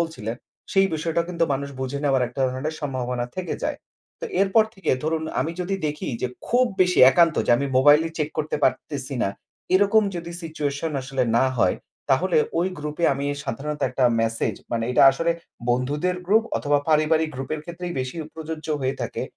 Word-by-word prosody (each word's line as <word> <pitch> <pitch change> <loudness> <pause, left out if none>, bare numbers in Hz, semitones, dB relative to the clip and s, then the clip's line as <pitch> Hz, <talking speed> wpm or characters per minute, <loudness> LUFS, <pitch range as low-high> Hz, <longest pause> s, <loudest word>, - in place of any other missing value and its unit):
বলছিলেন, 140 -10 -3 0.4
সেই 195 0 +5
বিষয়টা 165 +1 0
কিন্তু 170 -1 +1
মানুষ 140 +1 -2
বুঝে 130 +2 -3
নেওয়ার 135 -3 +2
একটা 130 +2 -7
ধরনের 140 +5 -3
সম্ভাবনা 125 -4 -2
থেকে 185 -1 -3
যায়। - - -1 0.4
তো - - -4 0.2
এরপর 200 +3 +4
থেকে 195 - -2
ধরুন 160 0 0 0.2
আমি 165 - -1
যদি 190 +2 -1
দেখি 150 0 -4
যে 125 - +1 0.2
খুব 250 +1 +4 0.2
বেশি 180 0 +3
একান্ত 170 0 +4
যে - - +2
আমি 140 - -1
মোবাইলই 150 +4 +5
চেক 150 0 0
করতে 150 0 -1
পারতেছি 140 -2 -1
না। - - +1 0.5
এরকম 205 +3 +5
যদি 170 0 -6
সিচুয়েশন 155 -1 -3
আসলে 130 0 -2
না 120 - +4
হয় 95 - +2 0.3
তাহলে 170 +6 +2 0.2
ওই 180 +2 +2
গ্রুপে 150 +3 -3
আমি 140 +1 -4 0.2
সাধারণত 150 +6 -4
একটা 130 0 +1 0.2
মেসেজ 115 0 0 0.2
মানে 115 -1 0
এটা 125 - +4
আসলে 165 +5 0 0.4
বন্ধুদের 145 +9 0
গ্রুপ 220 +3 +4
অথবা 145 0 +2
পারিবারিক 155 +1 +3
গ্রুপের 140 +4 -4
ক্ষেত্রেই 175 +1 -6
বেশি 130 +4 -5 0.2
প্রযোজ্য 160 -1 -6
হয়ে 130 0 0
থাকে - - -3
150 Hz, 175 wpm, -24 LUFS, 135-170 Hz, 0.5 s, সেই